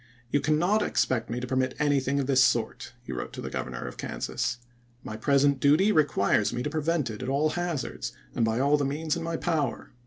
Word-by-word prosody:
You 145 - +2
cannot 175 +8 +2
expect 120 - 0
me 120 +2 -2
to 125 - -4
permit 130 0 0
anything 140 -2 +1
of 140 - 0
this 130 -1 +4
sort," - - 0
he 65 - -6
wrote - - -5
to - - -7
the - - -6
Governor 60 -1 -4
of - - -8
Kansas. 125 0 -3 0.5
"My 110 - -6
present 140 +4 +3
duty 155 +10 +4
requires 105 - +2
me 125 - -3
to 150 - -3
prevent 155 -4 0
it 105 - -8
at 130 - -3
all 145 +3 +2
hazards 170 - -3 0.2
and - - 0
by 110 +1 +1
all 140 +2 +4
the 145 - -1
means 150 +4 -1
in 170 - -4
my 165 0 -2
power." 155 -7 -2
140 Hz, 215 wpm, -27 LUFS, 125-155 Hz, 0.5 s, this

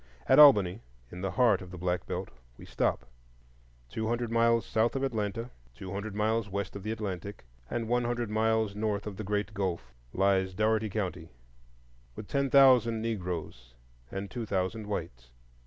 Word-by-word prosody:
At - - +6
Albany, 105 -9 +7 0.3
in 90 - -8
the 95 - -1
heart 115 -3 +3
of 90 - -9
the 90 - -9
Black 90 0 -2
Belt, - - -4 0.3
we - - -12
stop. 65 - -1 0.8
Two 110 - -4
hundred 120 0 -1
miles 115 0 +3
south 115 +3 +1
of 135 - -1
Atlanta, 115 -1 -2 0.2
two 90 +9 -8
hundred 100 +1 -5
miles 110 0 0
west 100 +1 -4
of 100 - -6
the 110 +3 -4
Atlantic, 100 - -5 0.2
and 115 -2 -2
one 120 +1 +1
hundred 120 -2 -2
miles 110 -1 +1
north 105 -1 -2
of 105 -2 -5
the 110 - -5
Great 105 +1 -2
Gulf 90 -10 -3 0.2
lies 95 +1 +1
Dougherty 110 +1 +1
County, 95 -5 -4 0.9
with 105 - -8
ten 140 -1 0
thousand 125 -4 +5
Negroes 85 - -5 0.3
and 95 +1 -6
two 120 -3 -5
thousand 95 +3 -2
whites. 70 -12 -5
105 Hz, 170 wpm, -29 LUFS, 95-115 Hz, 0.9 s, Albany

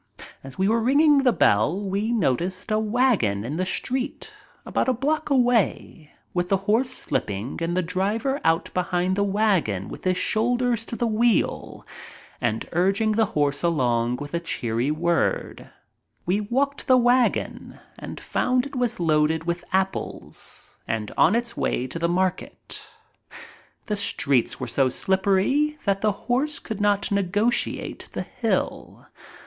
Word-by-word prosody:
As 135 -1 -10
we 190 +1 +2
were 225 +2 +2
ringing 285 +4 +5
the 265 -2 +4
bell 150 - +2
we 200 +3 -2
noticed 185 - -1
a 215 - +2
wagon 210 - +1
in 145 +6 -4
the 185 +1 -1
street 255 +6 -3 0.3
about - - -1
a - - +3
block 295 +6 -1
away, 240 - +1 0.2
with 175 0 -1
the 195 - +3
horse 230 +5 +2
slipping 110 - -3
and 170 +2 -1
the 185 - +2
driver 210 - -1
out 165 +1 +1
behind 180 0 0
the 200 - +1
wagon 195 - +1
with - - -9
his 185 -1 +1
shoulder 245 +4 +1
to 230 +1 -7
the 240 - -1
wheel 230 0 0 0.6
and 110 - -1
urging 195 +5 +2
the 220 0 +2
horse 145 -1 +1
along 125 -8 +1
with 145 +4 -8
cheery 120 -4 -1
words. 170 +2 0 0.6
We 190 +4 +1
walked 275 +7 0
to - - -9
the 255 -1 +6
wagon 245 0 +1 0.2
and - - -7
found 250 0 0
it 280 - -8
was 245 -5 -1
loaded 160 -1 +2
with 170 +1 -3
apples 190 0 -3
and 110 -2 -2
on 190 - +4
its 235 0 -2
way 125 - -1
to 135 +6 -6
the 170 0 +1
market. 185 +1 -3 1.0
The 210 - -1
streets 140 - 0
were 130 - -3
so 130 +2 +1
slippery 200 - +1
that 195 -1 +1
the 215 - +3
horse 280 +4 0
could 215 -2 -6
not 205 -1 +2
negotiate 200 +4 0
the - - -3
hill. - - -3
195 Hz, 150 wpm, -24 LUFS, 165-240 Hz, 1.0 s, the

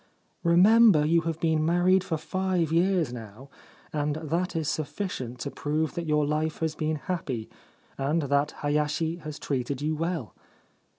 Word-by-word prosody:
Remember 185 0 +6
you 165 +2 +3
have 165 -1 -4
been 160 -2 +1
married 175 +3 +3
for 165 -4 -2
five 175 0 -1
years 170 -4 +2
now, 115 +3 -10 0.4
and 150 -1 0
that 165 +4 -2
is 160 -2 -1
sufficient 145 - -3
to 140 - -4
prove 155 +1 -1
that 170 -2 -4
your 150 -1 +2
life 155 +2 -1
has 160 -1 -1
been 155 0 -1
happy, 140 -8 -4 0.5
and 150 +4 +1
that 140 +1 +1
Hayashi 150 +3 0
has 155 -3 -7
treated 135 -1 -2
you 155 +2 -1
well.' 165 -5 -3
155 Hz, 155 wpm, -27 LUFS, 145-170 Hz, 0.5 s, Remember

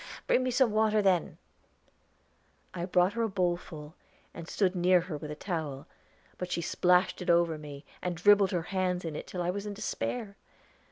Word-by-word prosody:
"Bring - - +3
me 255 - 0
some 255 -2 +3
water, 215 0 +2
then." 185 -3 +1 1.4
I 175 -1 -3
brought 180 +1 +2
her 235 - -2
a 225 - +1
bowl 180 -3 +1
full, 155 -3 -10 0.4
and 170 -1 -9
stood 190 -1 0
near 180 0 +4
her 175 -2 -6
with 150 0 -7
a 150 - -5
towel; 150 -6 -4 0.5
but 180 0 -4
she - - 0
splashed 180 +2 +2
it 180 - -4
over 170 -1 +3
me, 145 -1 -10 0.2
and 180 -2 -3
dribbled 200 +2 +5
her 175 -2 -1
hands 180 -1 -1
in 160 -2 -4
it - - -6
till 180 -1 -4
I 175 - 0
was 200 +2 -5
in 205 - -5
despair. 215 0 -4
180 Hz, 190 wpm, -30 LUFS, 170-200 Hz, 1.4 s, dribbled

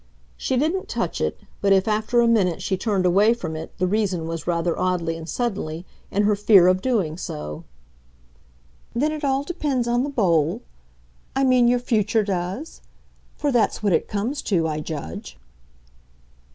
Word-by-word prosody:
She 260 - -1
didn't 325 +8 0
touch - - -2
it, - - -1 0.2
but 200 - +2
if 190 +1 +4
after 220 +3 +2
a 235 - +3
minute 195 -7 +2
she 190 - -1
turned 190 -1 0
away 205 +6 +4
from 165 -9 -5
it 160 +1 -6
the 185 - +1
reason 190 -4 0
was, 165 -1 -5
rather 170 -1 0
oddly 175 -3 0
and 165 0 -8
suddenly, 190 -9 -3 0.2
in 205 - +1
her 210 0 +3
fear 200 -3 +6
of 185 +1 +3
doing 195 -11 0
so. 75 - -6 1.3
"Then 295 +6 +1
it 310 0 -5
all 275 0 +1
depends 285 -7 -1
on 240 +1 +2
the 285 - -2
bowl? 170 - +1 0.7
I 270 - +2
mean 255 -2 +4
your 245 +1 +4
future 220 -2 +1
does? 195 - -4 0.5
For 290 - -1
that's 235 -3 +1
what 200 -3 +2
it - - +1
comes 230 +8 -2
to, 170 -6 +1
I 155 -1 -2
judge." 145 - -6
200 Hz, 170 wpm, -23 LUFS, 170-240 Hz, 1.3 s, fear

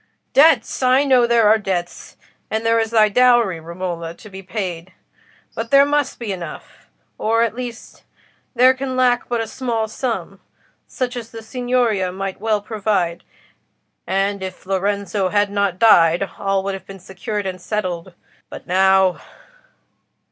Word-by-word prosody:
Debts! 280 -5 +4
I 255 +2 +4
know 255 -4 +4
there 235 -2 +4
are 220 +1 +5
debts; 180 -4 -4 0.3
and 220 +1 -2
there 230 0 +3
is 225 0 0
thy 220 -2 +4
dowry, 235 -5 +3
Romola, 170 0 -6
to 215 - -14
be 190 0 -9
paid. 185 -3 -5 0.6
But 230 0 -5
there 280 0 +6
must 290 -1 0
be 230 -4 -5
enough—or, 195 +5 -4
at 230 - -1
least, 245 -1 -8 0.5
there 255 +2 +6
can 260 0 -4
lack 250 -1 +2
but 240 -1 0
a - - -2
small 230 -1 -2
sum, 230 +2 -4 0.5
such 250 0 -3
as 235 -2 -6
the 225 -1 -10
Signoria 240 -6 0
might 195 +1 -5
well 215 -1 0
provide. 200 -5 -2 0.8
And 195 +1 0
if 185 -1 -7
Lorenzo 195 0 -1
had 205 +1 +1
not 200 -3 0
died, 175 -3 +5
all 195 -1 0
would 195 0 -2
have 190 -1 -9
been 195 - -9
secured 195 +3 -5
and 185 -1 -5
settled. 185 -3 -4 0.3
But - - -10
now..." 190 0 +3
210 Hz, 150 wpm, -20 LUFS, 190-235 Hz, 0.8 s, there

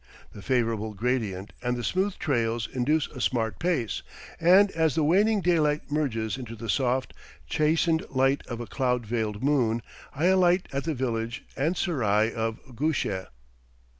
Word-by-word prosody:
The 105 - -10
favorable 115 -3 0
gradient 105 -4 -2
and 125 0 -1
the 120 - -4
smooth 190 - 0
trails 115 -6 0
induce 145 +5 +1
a 130 - -8
smart 115 -3 0
pace, 160 - -1 0.4
and 190 +4 +6
as 160 -3 +1
the 160 - +2
waning 200 +7 +3
daylight 155 -4 +1
merges 120 -7 -1
into 120 -3 -7
the 115 -1 -3
soft, 130 0 0 0.3
chastened 160 +1 +2
light 135 +1 +2
of 120 -2 -5
a 120 - -4
cloud 125 0 -1
veiled 110 -1 -2
moon, 120 -6 +2 0.3
I 155 +5 0
alight 185 -1 +4
at 140 0 -2
the 160 -2 -1
village 115 -2 -2
and 160 +6 0
serai 110 - +1
of 115 -1 -2 0.2
Gusheh. 120 -10 -1
130 Hz, 155 wpm, -27 LUFS, 115-160 Hz, 0.4 s, and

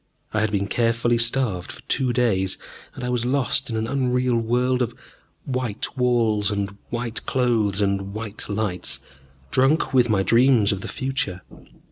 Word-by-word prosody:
I 110 - +1
had 110 -1 +1
been 100 -1 0
carefully 115 +2 +1
starved 115 -7 +1
for - - -10
two 130 -2 +1
days, 110 -6 +1 0.4
and 125 - -7
I 125 - -2
was 125 -1 0
lost 130 +1 +1
in 115 - -2
an 110 - -1
unreal 125 -1 +1
world 125 +2 +1
of 120 - -1 0.5
white 125 -5 -3
walls 115 -5 +2
and 100 -1 -2
white 120 -1 -3
clothes 110 -6 +1
and 100 0 -1
white 110 0 -5
lights, 100 -4 -1 0.5
drunk 135 +3 +2
with 125 -2 +4
my 100 -3 +2
dreams 115 -1 +4
of 100 -2 -3
the - - -5
future. 130 -9 -3
115 Hz, 160 wpm, -23 LUFS, 105-125 Hz, 0.5 s, with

